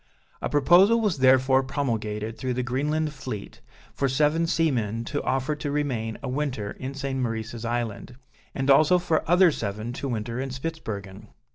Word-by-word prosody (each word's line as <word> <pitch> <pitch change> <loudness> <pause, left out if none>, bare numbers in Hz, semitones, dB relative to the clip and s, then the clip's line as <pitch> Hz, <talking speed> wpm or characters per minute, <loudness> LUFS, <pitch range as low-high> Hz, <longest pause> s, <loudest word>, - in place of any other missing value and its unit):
A - - -2
proposal 175 +10 +5
was 210 -10 0
therefore 130 0 +5
promulgated 115 -5 -3
through 130 -2 -3
the 125 - -1
Greenland 150 +5 -1
fleet, 130 -7 -7 0.3
for 135 - 0
seven 150 +5 +2
seamen 115 - 0
to 145 +4 -2
offer 135 +3 -1
to 145 - -4
remain 130 -7 -2
a - - -3
winter 125 -6 -2
in 135 +1 -6
St. 135 -1 -3
Maurice's 115 -1 -3
Island, 120 0 -3 0.4
and 135 0 +2
also 155 +6 +6
for 170 -3 0
other 180 0 +6
seven 110 -1 -4
to 140 - -4
winter 115 +1 -3
in 135 - -3
Spitzbergen. 110 -9 -6
130 Hz, 160 wpm, -25 LUFS, 115-150 Hz, 0.4 s, also